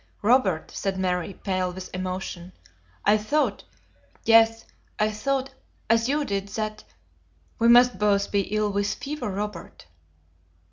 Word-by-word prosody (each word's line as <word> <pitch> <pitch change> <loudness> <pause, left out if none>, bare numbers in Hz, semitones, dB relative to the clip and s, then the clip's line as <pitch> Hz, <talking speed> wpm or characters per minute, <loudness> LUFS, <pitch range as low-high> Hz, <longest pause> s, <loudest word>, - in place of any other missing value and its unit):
"Robert," 210 -8 +2
said 195 -1 -3
Mary, 180 0 -1
pale 185 -2 -1
with 185 +1 -9
emotion, 185 -1 -5 0.5
"I 210 +1 +5
thought 290 +9 0 0.6
yes, 225 0 +5 0.3
I 215 0 +1
thought 270 +4 -2 0.4
as 230 +2 +3
you 295 +1 +1
did, 200 -3 -2
that 215 +1 -4 0.8
We 230 - +3
must 245 +1 +6
both 200 -1 +2
be 200 - +2
ill 215 -1 +1
with 200 0 0
fever, 295 -5 -5
Robert." 200 -2 -6
210 Hz, 130 wpm, -25 LUFS, 190-230 Hz, 0.8 s, must